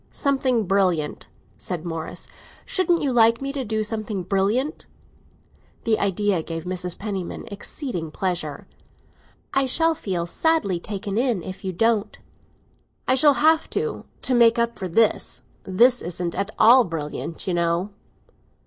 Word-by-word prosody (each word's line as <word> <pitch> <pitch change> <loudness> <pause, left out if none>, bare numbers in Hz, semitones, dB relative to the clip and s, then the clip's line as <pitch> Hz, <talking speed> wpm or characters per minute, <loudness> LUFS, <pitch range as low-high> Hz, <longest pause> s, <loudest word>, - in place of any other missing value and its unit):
"Something 265 -5 +1
brilliant," 180 -5 0 0.3
said 175 -3 -4
Morris. 165 -2 -5 0.4
"Shouldn't 350 -3 +1
you 270 -3 0
like 230 0 +5
me 275 0 -4
to 275 -2 -2
do 220 -1 -1
something 215 -3 -3
brilliant?" 205 - 0 1.0
The 220 -1 +1
idea 200 -2 +1
gave 165 0 -6
Mrs. 180 -1 -2
Penniman 195 -4 -5
exceeding 200 - -4
pleasure. 175 -4 -3 0.9
"I 270 0 +3
shall 325 +5 +3
feel 185 - -3
sadly 200 - +1
taken 200 +2 -3
in 240 -8 0
if 190 +1 -8
you 190 - -2
don't." 215 +2 +1 0.9
"I - - +4
shall 280 +2 +5
have 320 0 +4
to, 455 - -2 0.2
to 260 - +1
make 235 -1 +5
up 235 0 0
for 190 - -3
this. 215 +5 +1 0.2
This 240 +7 +4
isn't 175 0 -3
at 200 +2 -2
all 245 +3 +7
brilliant, 165 -1 -5
you 185 - -1
know." 170 +3 0
205 Hz, 140 wpm, -23 LUFS, 180-245 Hz, 1.0 s, all